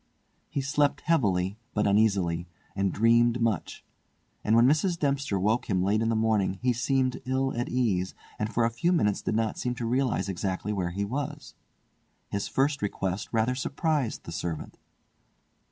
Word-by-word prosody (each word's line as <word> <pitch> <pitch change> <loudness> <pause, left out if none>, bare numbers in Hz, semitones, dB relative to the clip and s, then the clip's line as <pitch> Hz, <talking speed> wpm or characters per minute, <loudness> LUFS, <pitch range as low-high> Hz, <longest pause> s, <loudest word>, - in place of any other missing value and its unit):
He 140 - -2
slept 145 +1 +1
heavily 100 - +1 0.2
but 105 - +2
uneasily, 100 -5 +2 0.3
and 100 -1 +1
dreamed 115 +3 +3
much; 115 -7 -1 0.6
and 110 - +3
when 115 +1 +6
Mrs. 155 +6 +2
Dempster 140 - 0
woke 110 +6 +1
him 95 -3 +2
late 105 +3 +2
in 115 - +1
the 115 - +1
morning 110 -4 +1
he 125 -1 +3
seemed 130 +1 0
ill 130 +1 0
at 120 +1 -2
ease, 100 -8 0 0.2
and 110 0 -1
for 115 0 +2
a 115 - +1
few 120 +10 0
minutes 105 - +2
did - - -1
not 110 -1 0
seem 125 0 -2
to 120 - -4
realise 125 -1 0
exactly 95 +2 -2
where 90 -3 -1
he 100 +3 -2
was. 135 +7 -5 0.8
His 100 0 -2
first 140 +2 +1
request 100 -1 -2
rather 115 +2 +2
surprised 140 -1 -1
the - - -8
servant. 80 -1 -5
115 Hz, 170 wpm, -28 LUFS, 100-130 Hz, 0.8 s, when